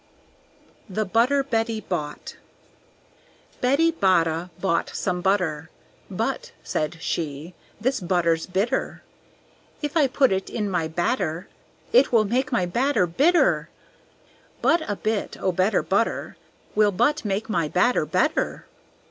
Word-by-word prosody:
The 215 +3 -1
Butter 245 +8 +2
Betty 225 -3 -1
Bought 150 -8 -5 1.3
Betty 280 +7 +3
Botta 175 - +1
bought 180 -4 0
some 180 -1 -1
butter; 175 -5 0 0.4
"But," - - -3
said 155 +2 -2
she, 155 0 -4 0.3
"this 260 +4 0
butter's 170 -3 +1
bitter! 195 +5 -1 0.8
If 295 +1 -3
I 300 -4 +4
put 265 -1 +2
it 190 0 -1
in 210 -4 -2
my 170 -3 0
batter 170 0 -2 0.4
It - - +5
will 225 -3 +4
make 255 +7 0
my 185 -7 +1
batter 240 +3 +1
bitter. 290 - +2 0.9
But 335 0 +3
a 205 - 0
bit 215 +1 -2
o' 190 - +1
better 185 +4 +1
butter - - -1 0.4
Will 210 -1 +4
but 295 +11 +1
make 205 0 -2
my 170 -8 0
batter 180 0 +2
better." 185 - 0
195 Hz, 125 wpm, -24 LUFS, 175-250 Hz, 1.3 s, It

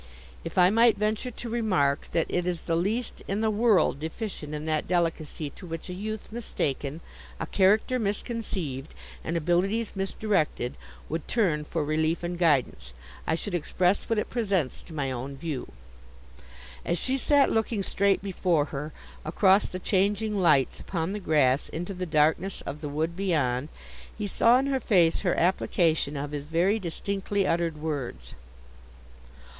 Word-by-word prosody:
If 165 - -7
I 180 +1 +6
might 230 +1 +5
venture 215 +4 0
to 240 0 -7
remark 185 -12 +1
that 165 - +2
it 180 0 -1
is 175 -2 -1
the 165 - -1
least 215 +8 -1
in 200 +2 -1
the 220 -1 +2
world 210 - +3
deficient 160 -2 -5
in 150 +1 -5
that 155 -1 0
delicacy 165 -4 -1
to 185 - -11
which 165 +2 -6
a - - -4
youth 215 +4 -5
mistaken, 150 - -3 0.4
a - - -2
character 210 +6 +3
misconceived, 200 - -3 0.3
and 170 - -1
abilities 185 +7 +1
misdirected, 190 - -1 0.3
would 160 0 -4
turn 175 -10 +1
for 160 0 -2
relief 155 +3 0
and 175 0 -3
guidance, 130 - +1 0.3
I 160 - +2
should 190 +3 -5
express 180 +3 +1
what 225 - +1
it 210 - -1
presents 195 - 0
to - - -13
my 135 -3 -1
own 130 +2 -5
view.' 150 -3 -4 1.1
As 170 - 0
she 260 +9 0
sat 280 +1 +3
looking 220 -2 0
straight 200 +1 +1
before 180 -6 +1
her, 150 +2 -4 0.3
across 190 +5 +4
the 185 - -5
changing 205 +3 +1
lights 170 -9 +3
upon 170 -1 -3
the 210 - -3
grass 145 -7 +2
into 175 +4 -4
the 180 -1 -4
darkness 160 +5 +2
of 150 - -6
the 150 - -4
wood 160 +4 -1
beyond, 150 -8 0 0.5
he 210 - -3
saw 230 +4 +4
in 265 - +1
her 275 -1 +1
face 175 -9 +3
her 180 -4 +1
application 165 -4 +1
of 145 +1 -4
his 145 -1 -5
very 180 +7 +2
distinctly 195 +2 -2
uttered 165 -2 0
words. 140 - -4
175 Hz, 160 wpm, -27 LUFS, 155-205 Hz, 1.1 s, I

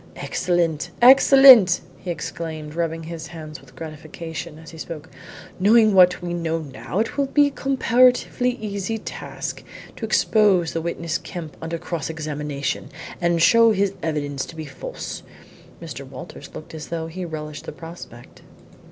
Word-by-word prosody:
"Excellent! 170 -4 -1
excellent!" 260 -6 +8 0.2
he 180 - -8
exclaimed, 160 -3 -5
rubbing 165 0 -2
his 165 0 -7
hands 155 -2 -9
with - - -19
gratification 160 +1 -8
as 160 0 -12
he 165 - -12
spoke. 160 0 -8 0.5
"Knowing 215 +2 +5
what 180 -1 +5
we 175 -1 -3
know 165 -1 -1
now, 135 -1 -6
it 225 +6 -1
will 280 -1 +1
be 290 +2 +4
a 285 - -1
comparatively 250 -1 +2
easy 205 +1 -3
task - - -6 0.3
to - - -11
expose 210 -5 +3
the 165 - -2
witness 170 0 -3
Kemp 165 -5 -8
under 165 +1 -3
cross 165 -3 -4
examination, 150 -3 -4 0.3
and 170 -1 +2
show 230 +2 +6
his 195 -1 +1
evidence 145 -3 -2
to - - -11
be 160 -1 -6
false." - - -7 0.6
Mr. 150 -5 -7
Walters 130 -1 -10
looked 155 - -9
as 155 -1 -7
though 165 -1 -4
he 175 +3 -6
relished 150 -3 -6
the - - -6
prospect. 150 -6 -12
165 Hz, 150 wpm, -22 LUFS, 155-200 Hz, 0.6 s, excellent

